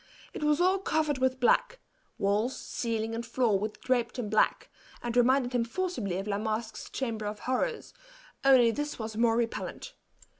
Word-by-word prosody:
It - - -5
was 300 +1 +3
all 375 +2 +3
covered 310 -6 0
with 260 0 +1
black - - +2 0.4
walls, 210 +6 0
ceiling, 225 -1 -3
and 230 +1 -3
floor 235 -6 +1
were 210 - 0
draped 240 +2 -1
in 220 -5 -3
black, 215 - +2 0.3
and 240 -1 -3
reminded 250 +1 +3
him 245 -1 +2
forcibly 235 - -2
of 195 - -3
La 205 -1 -1
Masque's 220 +1 -3
chamber 225 -5 -3
of 210 0 -5
horrors, 360 - -2 0.5
only 255 -4 +6
this 295 +4 -3
was 220 -1 -5
more 230 0 +3
repellant. 240 - -3
240 Hz, 165 wpm, -29 LUFS, 220-270 Hz, 0.5 s, only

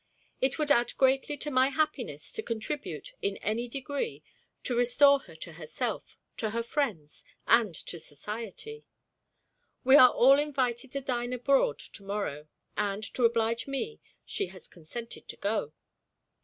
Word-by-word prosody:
It 265 0 +2
would 300 -2 +1
add 240 -4 +3
greatly 270 +2 +3
to 295 +2 -4
my 260 0 +4
happiness 305 - -2
to 445 - -2
contribute, 290 - -4
in 200 0 -1
any 230 +3 -1
degree, 280 - -3 0.4
to 245 - -1
restore 275 +4 +5
her 170 -11 -15
to 160 +1 -9
herself, 175 +8 -4 0.2
to 220 - -1
her 230 +2 -1
friends, 225 - -2 0.2
and 225 -7 +4
to 170 - -6
society. 215 - -7 1.0
We 265 +2 +8
are 255 -4 +10
all 270 +4 +6
invited 265 -4 -1
to 275 - -2
dine 245 -2 -2
abroad 250 - +3
to - - -11
morrow; 195 -7 -3 0.3
and, 205 +1 -1
to 245 - +2
oblige 230 0 +1
me, 275 +12 -3 0.3
she - - -2
has 185 -1 -14
consented 225 +8 -9
to - - -8
go. 200 -7 -1
240 Hz, 150 wpm, -29 LUFS, 210-275 Hz, 1.0 s, are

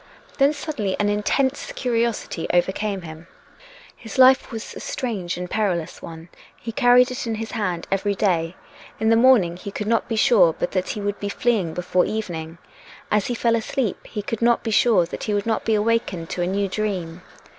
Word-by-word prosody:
Then, 275 +1 +5
suddenly, 275 -10 -3
an 205 0 +2
intense 265 - 0
curiosity 235 - -1
overcame 190 +2 0
him. 160 +1 -10 0.7
His 225 0 -9
life 260 +1 +6
was 225 -1 -6
a - - -8
strange 200 -10 -3
and 180 0 -4
perilous 180 -6 -2
one; 165 +1 -10 0.3
he 230 - -6
carried 245 0 +4
it 250 - -4
in 225 - -1
his 220 0 -5
hand 185 -7 -2
every 200 +1 0
day. 175 -4 0 0.4
In 220 +1 +2
the 225 - +5
morning 225 -8 +4
he 190 - -7
could 210 +1 -5
not 230 +1 +1
be 225 - -1
sure 220 -8 +5
but - - -2
that 185 -1 -1
he 210 - -3
would 205 0 -3
be 205 - -3
fleeing 200 -8 0
before 180 0 +1
evening. 170 -7 -4 0.5
As 210 -1 +2
he 245 - -2
fell 230 0 +2
asleep, 225 -1 -2
he 210 - -5
could 230 +1 -4
not 235 0 +3
be 225 - -2
sure 215 -5 +4
that 165 - -6
he 210 - 0
would 205 - -1
not 225 -1 -1
be 220 - +2
awakened 210 -6 -1
to 175 - -3
a 175 - 0
new 200 +2 0
dream. 185 -4 -3
210 Hz, 200 wpm, -22 LUFS, 180-230 Hz, 0.7 s, life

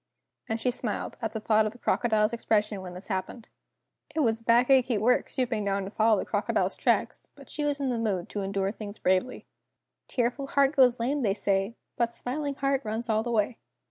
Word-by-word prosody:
And 225 +1 -1
she 250 - +1
smiled 235 -4 -3
at 225 -2 -2
the 220 - -4
thought 215 0 +3
of 215 - -5
the - - -15
crocodile's 220 -2 +1
expression 215 -3 0
when 180 -1 -8
this 180 - -9
happened. 210 +4 -4 0.7
It 320 - +2
was 225 -4 +1
back 235 +3 +4
achy 255 -3 +4
work 240 +5 +2
stooping 240 -5 -1
down 200 0 0
to 195 - -6
follow 220 0 +3
the - - -2
crocodile's - - 0
tracks, - - 0
but - - -14
she 300 - -3
was 290 -1 0
in 275 -2 -1
the 235 - -1
mood 195 -6 -1
to 205 - -3
endure 195 0 -1
things 210 -1 -8
bravely. 185 +7 0 0.6
"Tearful 250 +3 -1
heart 280 +1 +2
goes 250 -3 +5
lame 275 +5 0
they 200 -5 +1
say, 200 +2 0 0.2
But 235 -1 0
smiling 280 +3 -3
heart 275 0 0
runs 225 +2 -3
all 220 0 +2
the 240 - -4
way!" 225 0 0
225 Hz, 205 wpm, -28 LUFS, 210-250 Hz, 0.7 s, goes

